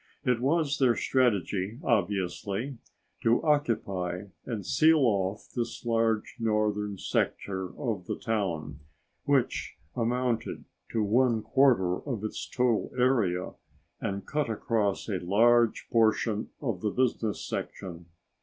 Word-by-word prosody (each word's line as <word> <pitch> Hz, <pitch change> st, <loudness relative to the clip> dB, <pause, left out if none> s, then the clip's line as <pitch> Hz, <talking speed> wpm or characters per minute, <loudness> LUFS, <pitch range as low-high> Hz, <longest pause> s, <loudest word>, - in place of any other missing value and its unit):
It 125 Hz, -2 st, +2 dB
was 145 Hz, +1 st, +1 dB
their 125 Hz, -3 st, +4 dB
strategy, 105 Hz, -4 st, +1 dB
obviously, 100 Hz, +3 st, -1 dB, 0.4 s
to 115 Hz, +1 st, +4 dB
occupy 100 Hz, -, 0 dB, 0.2 s
and 110 Hz, -6 st, -4 dB
seal 160 Hz, -1 st, +4 dB
off 100 Hz, -4 st, 0 dB
this 120 Hz, 0 st, -3 dB
large 115 Hz, -1 st, +1 dB
northern 105 Hz, -2 st, 0 dB
sector 95 Hz, 0 st, -1 dB
of 110 Hz, -9 st, -3 dB
the -, -, -2 dB
town, 95 Hz, -, -2 dB, 0.5 s
which -, -, 0 dB, 0.2 s
amounted 120 Hz, 0 st, -1 dB, 0.3 s
to 110 Hz, -, +2 dB
one 115 Hz, +1 st, +2 dB
quarter 110 Hz, -7 st, +3 dB
of 120 Hz, -8 st, -4 dB
its 110 Hz, -, -4 dB
total 125 Hz, -3 st, +1 dB
area 110 Hz, -9 st, +2 dB, 0.5 s
and 100 Hz, -2 st, -3 dB
cut 150 Hz, -4 st, -1 dB
across 110 Hz, -2 st, 0 dB
a 100 Hz, -4 st, -1 dB
large 115 Hz, +5 st, +3 dB
portion 110 Hz, -1 st, +2 dB
of 115 Hz, -10 st, -3 dB
the 105 Hz, -, +1 dB
business 115 Hz, -2 st, 0 dB
section. 85 Hz, -2 st, -6 dB
110 Hz, 115 wpm, -28 LUFS, 100-125 Hz, 0.5 s, their